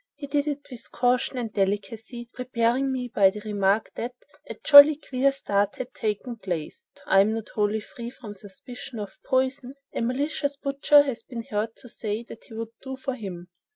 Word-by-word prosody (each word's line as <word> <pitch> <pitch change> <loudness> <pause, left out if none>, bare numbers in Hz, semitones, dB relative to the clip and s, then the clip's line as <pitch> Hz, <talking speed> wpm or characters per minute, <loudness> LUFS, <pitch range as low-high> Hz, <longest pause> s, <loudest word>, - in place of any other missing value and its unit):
He 285 0 -7
did 285 +1 0
it 290 -1 -3
with 245 - -9
caution 250 +1 +1
and 230 -3 -3
delicacy, 220 +4 -2
preparing 250 +1 0
me 255 -1 -2
by 200 -5 +5
the 210 +2 -7
remark 205 0 +1
that 245 +2 -5 0.3
'a - - -5
jolly 290 +1 +10
queer 275 -2 +1
start 205 -7 0
had 255 0 -6
taken 225 +3 -3
place.' 175 -7 -5 0.2
I 195 - +5
am 210 +3 +4
not 225 -1 -5
wholly 210 0 0
free 235 +3 -8
from 235 -4 -10
suspicions 215 +4 -9
of 205 -2 -7
poison. 260 0 0 0.2
A - - -2
malicious 285 +3 -1
butcher 280 +1 +4
has 270 -5 -4
been 235 -2 -7
heard 220 -2 -3
to - - -14
say 220 -1 -4
that 230 - -12
he 225 - -12
would 225 0 -4
'do' 265 -1 -6
for 265 0 -3
him. 185 -7 -7
235 Hz, 190 wpm, -26 LUFS, 210-265 Hz, 0.3 s, jolly